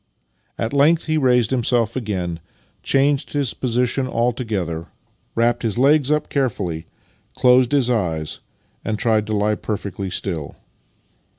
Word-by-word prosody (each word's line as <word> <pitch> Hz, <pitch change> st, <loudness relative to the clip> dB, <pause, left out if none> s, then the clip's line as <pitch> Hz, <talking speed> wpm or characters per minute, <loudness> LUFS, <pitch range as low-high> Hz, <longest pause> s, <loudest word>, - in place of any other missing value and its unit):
At 115 Hz, +3 st, -2 dB
length 155 Hz, +4 st, +4 dB
he 155 Hz, -1 st, +1 dB
raised 125 Hz, -4 st, +3 dB
himself 120 Hz, -2 st, +1 dB
again, 95 Hz, -8 st, -3 dB, 0.4 s
changed 140 Hz, +1 st, +1 dB
his 140 Hz, -5 st, 0 dB
position 125 Hz, +1 st, 0 dB
altogether, 110 Hz, -10 st, -2 dB, 0.5 s
wrapped 115 Hz, +1 st, +2 dB
his 115 Hz, -3 st, -1 dB
legs 140 Hz, +2 st, +4 dB
up 150 Hz, 0 st, +1 dB
carefully, 95 Hz, -, -2 dB, 0.5 s
closed 125 Hz, 0 st, +4 dB
his 140 Hz, -4 st, +3 dB
eyes, 85 Hz, -10 st, -1 dB, 0.4 s
and 110 Hz, -, -2 dB
tried 110 Hz, -1 st, +1 dB
to 110 Hz, -, -2 dB
lie 105 Hz, +1 st, +1 dB
perfectly 100 Hz, -2 st, -4 dB
still. 85 Hz, -5 st, -3 dB
115 Hz, 125 wpm, -21 LUFS, 100-130 Hz, 0.5 s, length